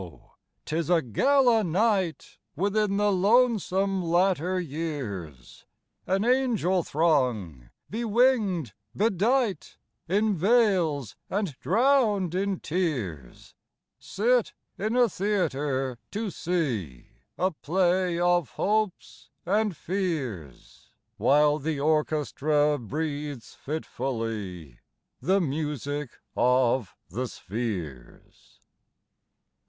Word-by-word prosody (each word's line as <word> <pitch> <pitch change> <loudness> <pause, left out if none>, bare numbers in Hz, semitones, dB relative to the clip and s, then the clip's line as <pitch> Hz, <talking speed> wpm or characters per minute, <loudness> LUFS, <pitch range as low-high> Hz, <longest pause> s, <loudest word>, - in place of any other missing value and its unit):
'tis 165 +1 -2
a 175 -2 +5
gala 240 - +3
nightWithin 200 +1 0
the 205 0 +2
lonesome 195 -2 +2
latter 180 +1 +1
years! 130 - -6 0.4
An 195 +3 +1
angel 235 -8 +2
throng, 125 - 0 0.2
bewinged, 220 - +1 0.2
bedightIn 210 - 0
veils, 185 - +2
and 195 -7 -2
drowned 215 - +2
in 195 0 -1
tears, 120 - -3 0.5
Sit 235 +3 +1 0.2
in 215 +4 -2
a 250 -1 +5
theatre, 145 - -1
to 210 -1 -3
seeA 125 - -2 0.6
play 180 +1 +1
of 175 -3 +2
hopes 215 -2 -2 0.2
and 205 -1 +1
fears, 145 - -4 0.3
While 150 +1 +4
the 150 0 -2
orchestra 150 -1 +1
breathes 145 +1 -5
fitfullyThe 115 - -4 0.7
music 145 -1 -3 0.3
of 125 -3 +2
the 125 +8 -3
spheres. 85 - -7
165 Hz, 75 wpm, -27 LUFS, 135-200 Hz, 0.7 s, a